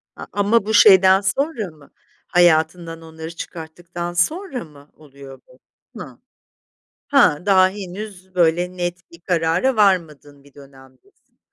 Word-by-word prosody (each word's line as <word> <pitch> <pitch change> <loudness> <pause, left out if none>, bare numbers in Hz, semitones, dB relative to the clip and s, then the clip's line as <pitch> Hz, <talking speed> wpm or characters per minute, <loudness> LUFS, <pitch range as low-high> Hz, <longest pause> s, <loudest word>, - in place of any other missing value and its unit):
A - - -9
ama 205 +2 +1
bu 220 - -2
şeyden 190 -2 +6
sonra 215 - -2
mı 150 -2 -21 0.4
hayatından 165 -1 +1
onları 160 0 -10
çıkarttıktan 170 +1 -8
sonra 275 - -2
mı 145 -2 -18
oluyor 140 -3 -15
bu? 125 - -22 0.4
Hı. - - -10 0.9
Ha, 150 +5 +3
daha 190 -2 +4
henüz 190 -1 -9
böyle 175 +1 +1
net 175 -1 -5
bir 170 - -15
karara 175 +8 0
varmadığın 160 -9 0
bir 140 -1 -22
dönemdesin. 135 -2 -20
175 Hz, 125 wpm, -20 LUFS, 155-195 Hz, 0.9 s, şeyden